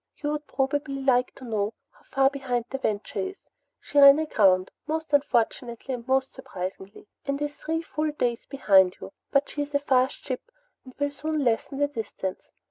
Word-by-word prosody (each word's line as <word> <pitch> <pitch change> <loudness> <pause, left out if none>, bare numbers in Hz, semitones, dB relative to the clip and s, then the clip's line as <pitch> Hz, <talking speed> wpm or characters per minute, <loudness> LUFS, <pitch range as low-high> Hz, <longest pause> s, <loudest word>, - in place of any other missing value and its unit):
"You 295 -1 -2
would 300 0 -4
probably 275 +1 -1
like 250 -2 +2
to 260 - -11
know 215 -2 -1 0.2
how - - -26
far 270 0 +3
behind 255 -4 -2
the 270 - -3
Venture 210 -4 -2
is. 385 0 -3 0.4
She 290 - 0
ran 280 0 +10
aground 195 -12 +3 0.2
most 315 -1 -3
unfortunately 245 -2 +1
and 240 -1 -6
most 265 0 +1
surprisingly 195 -6 -7 0.2
and 280 0 -1
is 295 0 -3
three 325 +1 -3
full 310 -1 -2
days 245 -6 -2
behind 195 -9 +4
you. - - -9 0.2
But 275 0 +2
she 295 - -4
is 290 0 -4
a - - +4
fast 260 -2 +2
ship 255 -2 -3 0.4
and 255 -1 -14
will 285 0 0
soon 305 +1 -2
lessen 245 +3 0
the 290 0 +2
distance. 220 -7 -5
270 Hz, 185 wpm, -26 LUFS, 235-290 Hz, 0.4 s, ran